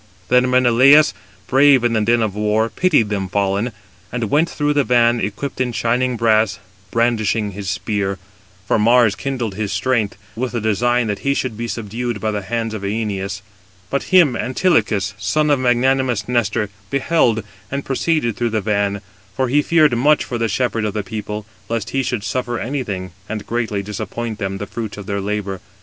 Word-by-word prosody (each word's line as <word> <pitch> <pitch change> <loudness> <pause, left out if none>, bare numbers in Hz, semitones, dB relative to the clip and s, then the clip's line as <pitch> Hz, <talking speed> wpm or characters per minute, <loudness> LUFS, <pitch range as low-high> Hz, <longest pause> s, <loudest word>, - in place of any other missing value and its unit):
Then 125 +1 +4
Menelaus, 130 +1 +6 0.3
brave 135 -1 +5
in 120 -1 +2
the 110 - +2
din 115 +2 +2
of 105 -3 -1
war, 105 +2 +1
pitied 150 - +2
them 100 -3 -2
fallen, 100 +4 0 0.4
and 115 -4 -3
went 160 +3 +3
through 150 0 0
the 145 -1 +3
van, 120 -1 +3
equipped 105 +7 -3
in 125 -1 0
shining 120 +2 0
brass, 110 -3 +2 0.3
brandishing 110 -2 +1
his 100 -1 -5
spear; 100 0 -2 0.5
for - - +2
Mars 115 0 +5
kindled 125 -3 -3
his 105 0 -3
strength, 105 0 0 0.2
with 125 +2 -3
the 120 - -1
design 120 +3 +1
that 105 -2 -2
he 140 0 0
should 130 -5 -2
be 120 +2 -4
subdued 115 +1 -4
by 110 +2 -1
the 105 -1 -2
hands 115 +2 -3
of 110 - -5
Æneas. 100 -1 -3 0.5
But 140 - -2
him 170 -9 +6
Antilochus, 120 - +1
son 150 +10 +1
of 140 - +3
magnanimous 125 -2 +1
Nestor, 110 -4 0 0.2
beheld, 130 -5 +2 0.3
and 140 0 -4
proceeded 135 -4 0
through 120 -1 -1
the 110 0 0
van, 100 -1 0 0.3
for 130 +1 0
he 145 +4 +3
feared 155 -4 +3
much 145 +5 +3
for 120 - -4
the 115 - +1
shepherd 115 0 -1
of 105 -1 -2
the 105 - -1
people, 105 +1 -5 0.2
lest 115 0 -2
he 135 - +1
should 125 -5 -2
suffer 120 0 -2
anything, 105 -9 -4 0.2
and 110 -1 -4
greatly 110 -4 -2
disappoint 110 +2 -5
them 95 -2 -2
of 95 - -6
[the - - -2
fruits 110 -1 -6
of] 100 - -7
their 100 -1 -2
labour. 100 -2 -3
115 Hz, 185 wpm, -19 LUFS, 105-125 Hz, 0.5 s, Menelaus